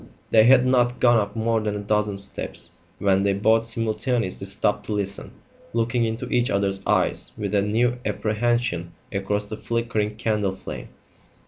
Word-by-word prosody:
They 110 -1 +6
had 125 0 +6
not 125 -1 +2
gone 120 -2 +5
up 100 0 -3
more 115 0 +1
than 105 -1 -2
a 105 0 -5
dozen 105 -1 0
steps 100 0 -3 0.3
when 95 -1 +2
they 100 0 +2
both 110 +3 +3
simultaneously 115 -3 -1
stopped 100 +1 -1
to 110 - -2
listen, 100 -1 -3 0.4
looking 115 +1 +1
into 115 +1 -3
each 120 0 +1
other's 100 -1 0
eyes - - +2
with - - -3
a 100 - +3
new 120 +4 +1
apprehension 110 -5 -1 0.2
across 105 +1 -1
the 105 +1 -7
flickering 115 -3 -2
candle 105 -3 -1
flame. 95 - -8
110 Hz, 160 wpm, -24 LUFS, 100-115 Hz, 0.4 s, They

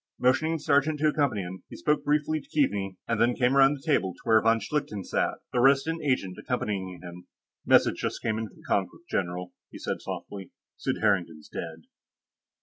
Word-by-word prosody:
Motioning 130 +6 +2
the 165 - -2
sergeant 150 +1 +2
to 155 0 +4
accompany 140 -9 +1
him, 90 +1 -7
he - - -9
spoke 150 +13 0
briefly 150 +1 +1
to - - -23
Keaveney 100 -10 0
and 115 -1 0
then 120 +1 +3
came 125 +1 +2
around 135 +1 +6
the 135 - -13
table 100 - +1
to - - -22
where 110 -1 +5
von 115 +1 +3
Schlichten 110 -4 -3
sat, - - 0 0.2
the 125 - +2
Resident 140 +5 +3
Agent 115 -10 -1
accompanying 95 -7 -3
him. 90 0 -10 0.4
"Message - - +5
just - - -3
came 110 -1 -1
in 110 - -3
from - - -18
Konkrook, 100 - -1
general," 90 0 -3 0.2
he - - -10
said - - -4
softly. 95 -2 -7 0.3
"Sid - - -2
Harrington's 85 -7 0
dead." 80 -1 -7
115 Hz, 190 wpm, -27 LUFS, 95-145 Hz, 0.4 s, around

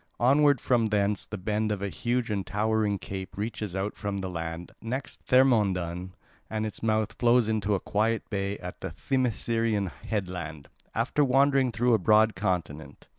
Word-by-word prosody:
Onward 140 +2 +4
from 120 -2 +2
thence 105 -1 0
the 110 - -5
bend 105 +3 -1
of 100 -1 -2
a 100 - -1
huge 120 +3 -1
and 100 -2 -1
towering 105 -1 +1
cape 95 0 -7
reaches 105 -2 -4
out 95 +2 -2
from 100 -1 -3
the 95 -1 -3
land, 85 0 -5
next 130 +4 -5
Thermodon 95 -8 +2 0.3
at 110 0 -2
its 110 - -5
mouth 110 -1 +1
flows 120 -1 +4
into 105 -2 +1
a - - -1
quiet 110 +4 0
bay 100 -1 -2
at 90 0 -8
the 95 - -3
Themiscyreian 115 - 0
headland, 90 -8 -5 0.3
after 115 +6 +1
wandering 135 -1 +3
through 120 +2 +2
a 110 - +4
broad 110 +3 +4
continent. 80 -5 -3
105 Hz, 165 wpm, -28 LUFS, 95-115 Hz, 0.3 s, Onward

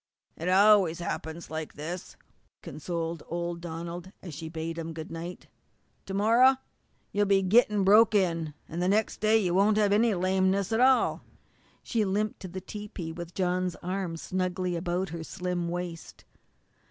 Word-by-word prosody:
"It 170 +3 -3
always 195 -3 +5
happens 165 -1 -5
like 160 -1 -5
this," 170 +4 -6 0.5
consoled 165 0 -4
old 170 0 -3
Donald, 170 +2 -6
as 175 -4 -7
she 160 +2 -6
bade 165 +1 -4
him 165 0 -5
good 160 0 -7
night. 170 +2 -7 0.6
"To 195 - -4
morrow 235 +6 +5 0.6
you'll 205 0 +1
begin 195 -1 +3
gettin' 210 -2 +4
broke 215 +3 +6
in, 165 -6 +1
an' 165 - -5
the 180 - +1
next 215 +2 +1
day 215 +1 +4
you 185 -5 +1
won't 205 +3 +4
have 205 -1 +3
any 220 0 +3
lameness 190 +2 +1
at 225 - +1
all." 255 -1 +4 0.6
She 230 -3 0
limped 210 +2 -1
to 185 - -7
the 185 +1 -7
tepee 200 -4 -7
with 170 +1 -8
John's 180 -1 0
arm 180 -2 -3
snugly 185 0 -2
about 175 +2 -2
her 165 0 -6
slim 180 -1 -3
waist. 175 -1 -6
180 Hz, 160 wpm, -28 LUFS, 170-200 Hz, 0.6 s, broke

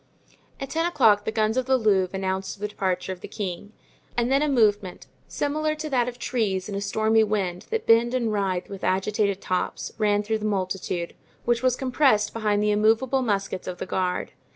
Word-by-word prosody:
At 275 -1 -6
ten 330 +3 +1
o'clock 220 -11 +4
the - - -1
guns 220 +1 0
of 255 0 0
the 265 0 +4
Louvre 195 -5 +2
announced 190 +1 -3
the 210 - -2
departure 190 -2 -2
of 185 - -7
the - - -7
king, 205 +1 -5 0.5
and 240 +1 +1
then 275 +1 +4
a 300 - +1
movement, 205 -7 +1 0.2
similar 305 +1 -1
to 310 -1 -6
that 245 -2 +2
of 245 - -10
trees 210 -7 -1
in 205 - -6
a 200 - -2
stormy 220 +2 +2
wind 195 -4 -2
that 450 0 -2
bend 235 +2 +4
and 230 -4 0
writhe 190 -3 -1
with 195 -1 -9
agitated 200 +1 0
tops, 185 0 -2
ran 205 -1 +2
though 220 +1 -1
the - - -8
multitude, 185 -3 -2 0.3
which 235 0 +2
was 255 -1 +2
compressed 255 -6 +2
behind 210 -2 0
the 210 - +2
immovable 225 +6 +2
muskets 200 -5 -2
of 180 - -4
the - - -4
guard. 185 -1 -2
210 Hz, 200 wpm, -25 LUFS, 195-245 Hz, 0.5 s, o'clock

